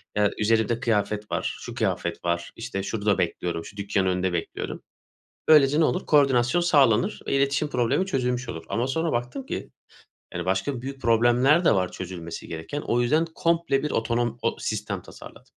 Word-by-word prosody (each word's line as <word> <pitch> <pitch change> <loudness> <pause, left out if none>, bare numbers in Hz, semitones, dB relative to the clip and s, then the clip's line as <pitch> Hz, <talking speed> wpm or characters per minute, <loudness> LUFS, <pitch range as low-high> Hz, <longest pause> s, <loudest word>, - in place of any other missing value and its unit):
ya, 105 -1 +3
üzerimde 110 +1 +2
kıyafet 105 -3 -1
var. - - -2
Şu - - -8
kıyafet 85 0 -2
var. 85 0 -1
İşte 115 -4 -4
şurada 105 0 0
bekliyorum. 85 -1 -2
Şu 105 - -12
dükkanın 100 -1 0
önünde 90 0 0
bekliyorum. 85 -1 -4 0.6
Böylece 150 -1 +6
ne 165 - +5
olur? 180 - -1
Koordinasyon 140 +1 +3
sağlanır, 135 -10 +3
iletişim 140 +2 +1
problemi 125 +8 +1
çözülmüş 125 -7 -1
olur. 80 -1 -6
Ama 120 +2 0
sonra 160 +4 -1
baktım 120 +2 -3
ki, - - -5 0.6
yani, - - -4
başka 95 +8 -1
büyük 135 +1 -7
problemler 120 +8 +4
de - - +5
var 90 -2 0
çözülmesi 85 -3 -7
gereken. 80 - -5
O 120 -3 0
yüzden 155 +7 +2
komple 165 -5 +1
bir 150 - -1
otonom 115 +1 0
o 115 - 0
sistem 105 -3 -3
tasarladım. - - -13
120 Hz, 165 wpm, -25 LUFS, 100-135 Hz, 0.6 s, Böylece